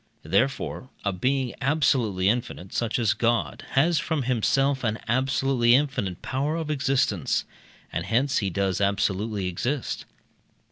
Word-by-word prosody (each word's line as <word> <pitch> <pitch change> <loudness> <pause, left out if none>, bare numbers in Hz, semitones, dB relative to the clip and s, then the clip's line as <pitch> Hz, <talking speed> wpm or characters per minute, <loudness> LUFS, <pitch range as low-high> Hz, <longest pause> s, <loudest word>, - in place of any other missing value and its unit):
Therefore 125 - 0 0.2
a 100 - +1
being 130 +6 0
absolutely 130 -9 +2
infinite, 110 -4 -1
such 115 -1 0
as 110 -5 +2
God, 115 +2 0
has 155 +4 +3
from 155 -2 -1
himself 130 +3 +1
an 110 -1 0
absolutely 130 0 +3
infinite 130 -10 -1
power 140 +4 -1
of 160 -2 -2
existence, 135 -2 +1 0.5
and 85 +2 -3
hence 130 +5 +2
he 100 - -1
does 95 +1 -1
absolutely 100 +1 0
exist. 120 +10 -2
120 Hz, 130 wpm, -25 LUFS, 100-135 Hz, 0.5 s, has